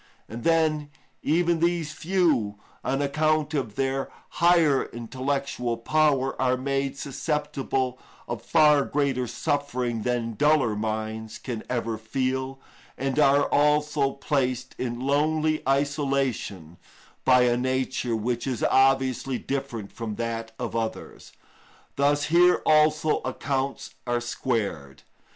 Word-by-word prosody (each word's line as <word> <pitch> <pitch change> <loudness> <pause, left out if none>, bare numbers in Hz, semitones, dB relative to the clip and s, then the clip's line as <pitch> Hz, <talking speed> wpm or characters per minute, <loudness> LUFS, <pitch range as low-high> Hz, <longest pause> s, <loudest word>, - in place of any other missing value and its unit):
And 115 +1 -8
then, 155 -3 +2 0.3
even 170 +1 +2
these 170 -2 0
few, 155 - +1 0.3
on 135 +2 0
account 155 +1 +1
of 120 -8 -2
their 135 0 -1 0.3
higher 170 -5 +4
intellectual 130 0 -3
power, 135 +1 +2
are 130 -1 +2
made 135 +1 -2
susceptible 140 -3 -2 0.3
of 120 -2 -4
far 150 +1 +4
greater 135 -4 0
suffering 125 -5 -2
than 120 -1 -1
duller 145 -3 +3
minds 110 +1 -4
can 120 -4 -5
ever 115 -3 -2
feel, 130 +3 -2 0.4
and 135 +2 -1
are 140 -1 +5
also 150 -1 +2
placed 130 -3 -1
in 120 -1 -3
lonely 155 +3 +1
isolation 135 - -1 0.5
by 125 -1 +5
a 120 -1 +3
nature 130 -1 -1
which 120 +3 -2
is 125 -4 -2
obviously 135 -1 +2
different 135 -7 -4
from 115 -3 -5
that 115 0 -4
of 120 -2 -4
others; 115 -1 -4 0.6
thus 145 +1 +2
here 175 +2 +4
also 155 0 +3
accounts 135 +1 -3
are 120 0 +1
squared. 105 - -3
135 Hz, 115 wpm, -26 LUFS, 120-150 Hz, 0.6 s, are